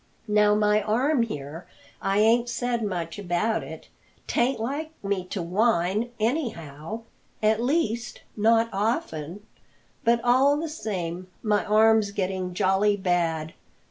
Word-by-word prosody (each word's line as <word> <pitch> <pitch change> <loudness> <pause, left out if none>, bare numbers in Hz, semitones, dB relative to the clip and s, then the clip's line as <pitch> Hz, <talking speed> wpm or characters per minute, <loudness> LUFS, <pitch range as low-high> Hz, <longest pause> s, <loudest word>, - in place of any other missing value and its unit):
Now, 210 0 +4
my 210 0 +3
arm 245 +7 +1
here 155 -6 -5 0.3
I 195 +1 0
ain't 230 +3 +4
said 245 -1 -1
much 175 -3 -3
about 200 +4 0
it - - -10 0.4
'tain't 245 +2 +1
like 280 +7 -3
me 195 -2 -1
to 185 0 -4
whine, 205 +3 +1
anyhow 215 - -3 0.4
at 215 +1 +3
least 240 -5 -1
not 225 +2 +3
often 195 -3 -2 0.6
but 235 0 +3
all 265 +4 +4
the 320 +1 -3
same, 185 - -4 0.2
my 210 -2 +2
arm's 220 0 +4
getting 185 -2 -3
jolly 200 +2 +2
bad. 170 -4 0
210 Hz, 125 wpm, -25 LUFS, 185-230 Hz, 0.6 s, Now